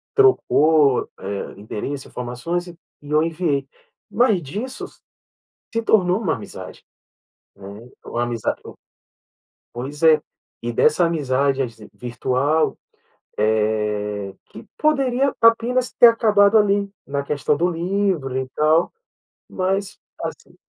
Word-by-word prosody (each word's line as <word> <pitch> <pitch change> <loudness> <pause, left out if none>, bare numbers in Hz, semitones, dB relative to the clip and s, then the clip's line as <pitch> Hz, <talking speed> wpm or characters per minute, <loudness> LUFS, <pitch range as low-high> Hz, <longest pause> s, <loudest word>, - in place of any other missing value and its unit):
trocou, 160 - +4
hã, 100 +1 -5
endereço 110 +7 -5
informações, 125 +9 -4
e 175 - -10 0.3
eu 150 +1 +1
enviei 160 -4 -1 0.4
mas 210 -3 +2
disso 210 - -5 0.9
se 230 - 0
tornou 190 -4 +3
uma 180 -8 0
amizade, - - -10 0.7
né, 100 +4 -11 0.2
uma 120 - -2
amizade 120 -2 -2 1.1
pois 135 +5 -6
é, 155 -2 +6 0.4
e 120 - -2
dessa 155 +8 +3
amizade 140 -4 0 0.3
virtual, 130 +5 0 0.6
eh, 105 -2 -1 0.2
que 110 - -11
poderia 275 -3 +1
apenas 235 +2 +3
ter 240 - +8
acabado 215 -2 +4
ali, 200 -1 +2 0.2
na 140 0 -2
questão 145 0 0
do 170 +4 +2
livro 175 -6 -1
e 130 - -2
tal, 155 +3 +3 0.6
mas 195 +1 -2 0.3
assim, - - -7
155 Hz, 105 wpm, -21 LUFS, 125-200 Hz, 1.1 s, ter